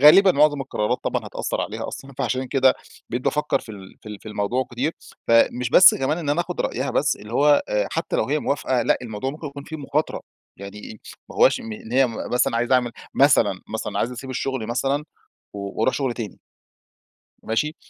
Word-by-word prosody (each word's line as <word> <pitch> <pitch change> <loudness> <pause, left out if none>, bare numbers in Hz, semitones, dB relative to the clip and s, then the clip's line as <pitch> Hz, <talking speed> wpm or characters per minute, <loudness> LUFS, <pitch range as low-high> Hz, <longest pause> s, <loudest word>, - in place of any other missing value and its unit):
غالبًا 185 +7 +8
معظم 145 0 +3
القرارات، 120 -6 -1
طبعًا - - -1
هتأثر - - -3
عليها - - -4
أصلًا 135 0 -8
فعشان 130 0 -1
كده 130 0 +4 0.4
بقيت 120 +1 -2
بافكّر 150 0 +1
في - - -16
ال 95 -2 -12
في - - -10
ال 105 -1 -7
في 110 - -10
الموضوع 105 +5 -1
كتير. 130 +6 -1 0.4
فمش 120 +1 +3
بس 185 - +8
كمان 135 +5 -1
إن 155 -4 -5
أنا 150 +4 +2
أخد 175 - -4
رأيها - - -1
بس، - - +1
اللي 105 +2 -11
هو 145 +3 +4
آآ 105 -1 0
حتّى - - -2
لو - - +2
هي 145 +6 0
موافقة 130 -4 0
لأ، - - +2
الموضوع 115 +2 -4
ممكن 150 +2 -8
يكون 140 0 -8
فيه 160 - -7
مخاطرة. 150 +1 -2 0.4
يعني 100 +2 -9
إيه؟ 110 - -9 0.3
ما - - -11
هواش - - +5
إن 110 0 -8
هي 135 +1 +5
مثلًا 120 0 -1
عايز 120 +2 0
أعمل 125 -2 +3 0.2
مثلًا - - +4
مثلًا - - -3
عايز 120 - 0
أسيب 130 +2 -7
الشغل 130 -2 -3
مثلًا 135 +5 -1 0.5
و 105 - -8 0.2
وأروح 120 +4 +2
شغل 135 -4 -1
تاني 110 -5 -6 1.0
ماشي؟ 150 +9 -1
130 Hz, 200 wpm, -23 LUFS, 115-145 Hz, 1.0 s, غالبًا